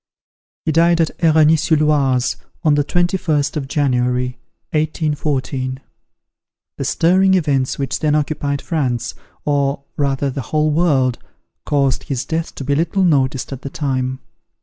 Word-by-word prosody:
He - - +1
died 170 +2 +4
at 165 - +1
Eragny 160 -1 +4
sur 160 +1 +2
l'Oise, 140 -5 +2 0.3
on 155 -3 +4
the 145 0 +2
21st 165 -3 0
of 140 -3 -3
January, 125 -3 +1 0.4
1814. 145 -4 -1 1.0
The - - -3
stirring 190 +3 +3
events 140 -7 +1
which 135 -2 -2
then 150 -1 +1
occupied 145 -1 -1
France, 130 -8 -1 0.3
or 140 -1 0
rather 140 -1 0
the 135 - -4
whole 155 0 +2
world, 140 -7 +2 0.5
caused 140 -3 +1
his 130 -4 -3
death 165 +1 -3
to - - -6
be 140 +2 0
little 170 +6 +1
noticed 135 -5 +1
at 130 - -8
the 140 - -5
time. 130 -3 -2
145 Hz, 140 wpm, -19 LUFS, 135-160 Hz, 1.0 s, died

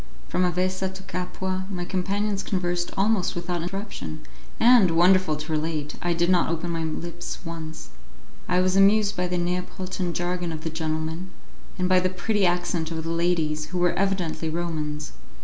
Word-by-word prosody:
From 180 - +1
Avessa 185 +2 0
to 190 - -9
Capua 185 +1 -3
my 180 -3 -3
companions 195 +2 -1
conversed 175 -2 -1
almost 200 -1 +2
without 175 0 -2
interruption, 180 - -5 0.3
and, 235 -5 +7
wonderful 175 0 +4
to 155 +2 -6
relate! 155 -1 -1
I 175 -1 +1
did 170 +1 +2
not 180 -2 +3
open 170 +1 -2
my 165 -1 -1
lips 165 +2 -4
once. 160 - -6 0.6
I 180 0 +4
was 185 0 +2
amused 200 +1 +5
by 180 0 0
the 180 0 -1
Neapolitan 180 +1 -2
jargon 175 0 -1
of 155 -1 -5
the 165 - -2
gentleman, 160 +2 -2 0.5
and 180 -1 +1
by 185 0 +5
the 185 0 +1
pretty 195 +2 +1
accent 175 -2 0
of 160 -1 -3
the 165 - -2
ladies, 165 -3 +1
who 180 - -5
were 175 0 +3
evidently 180 -5 0
Romans. 155 -3 -3
175 Hz, 165 wpm, -25 LUFS, 165-185 Hz, 0.6 s, and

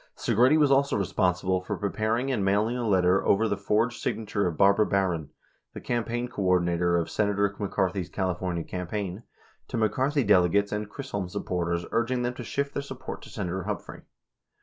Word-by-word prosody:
Segretti 130 +7 +3
was 145 -3 +4
also 140 -2 +3
responsible 95 -1 0
for - - -4
preparing 110 +5 -1
and 105 -6 0
mailing 105 +5 +2
a 120 -2 -2
letter 95 -1 +3
over 110 +3 +3
the 100 - 0
forged 105 +4 0
signature 105 -3 -1
of 85 -3 -3
Barbara 100 +2 +4
Barron, 90 -6 0 0.5
the - - -5
campaign 120 0 -2
coordina 90 -6 +1
tor 85 0 +2
of 85 - 0
Senator 100 -1 0
McCarthy's 95 -3 -1
California 90 -2 -2
campaign, 95 +3 -4 0.5
to - - -4
McCarthy 130 +6 +1
dele 90 -4 +5
gates 100 +3 +1
and 105 0 -2
Chisholm 100 -10 -4
supporters 85 -1 -2
urging 125 +2 0
them 120 0 -1
to 125 - -7
shift 140 +4 -2
their - - -2
support 135 -2 -7
to - - -12
Senator 95 -2 -3
Humphrey. - - -5
100 Hz, 170 wpm, -27 LUFS, 90-120 Hz, 0.5 s, dele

